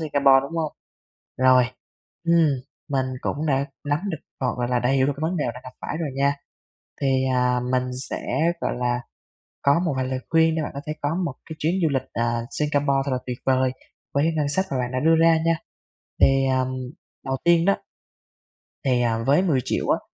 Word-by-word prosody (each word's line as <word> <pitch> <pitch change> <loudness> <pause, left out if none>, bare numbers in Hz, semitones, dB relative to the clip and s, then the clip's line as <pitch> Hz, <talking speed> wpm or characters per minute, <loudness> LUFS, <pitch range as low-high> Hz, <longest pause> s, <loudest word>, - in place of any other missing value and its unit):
Singapore, 140 -3 +4
đúng 165 +5 -6
hông? 155 -2 -1 0.7
Rồi, 130 -1 +6 0.6
ừm, 170 -1 +4 0.4
mình 135 -2 +1
cũng 150 +2 -2
đã 135 -2 +2 0.2
nắm 145 +1 +2
được, 160 - -3 0.2
gọi 130 -2 0
và 120 - 0
là, 125 0 +1
đầy 125 +3 +2
được 130 - +4
cái - - -9
vấn 170 +3 0
đề 150 - 0
bạn 125 - -10
gặp 130 - -8
phải - - -4
rồi 160 - -1
nha. 140 +1 +2 0.7
Thì, 140 - +1 0.3
à, 125 0 +2
mình 130 0 +2 0.3
sẽ, - - -3 0.4
gọi - - 0
là, 120 0 0 0.6
có 140 +4 +4
một 155 - +1
vài 130 - 0
lời 130 0 -2
khuyên 160 0 +4
để 160 - 0
bạn - - -4
có 140 - -4
thể 155 - -2
có 145 +2 0
một 140 - -3 0.2
cái 160 - -5
chuyến 160 +4 +1
du 160 - +4
lịch, 130 -1 -1
à, 115 0 0
Singapore 145 -2 +1
thật 140 - -2
là 125 - +1
tuyệt 125 -1 -4
vời 130 -1 +3 0.4
với 140 +2 +3
cái 165 - +2
ngân 150 -2 +1
sách 190 +7 +1
mà 135 - -1
bạn 125 -1 -1
đã 130 - -1
đưa 160 +3 +4
ra 165 0 +6
nha. 165 0 +3 0.6
Thì 135 0 +5
ờm, 130 0 0 0.5
đầu 135 0 0
tiên 170 -1 +5
đó, 200 +2 +4 1.1
thì, 125 -3 +2
à, 115 -1 +1
với 145 +7 +4
10.000.000 140 -9 0
á, - - +3
140 Hz, 210 wpm, -24 LUFS, 130-155 Hz, 1.1 s, Rồi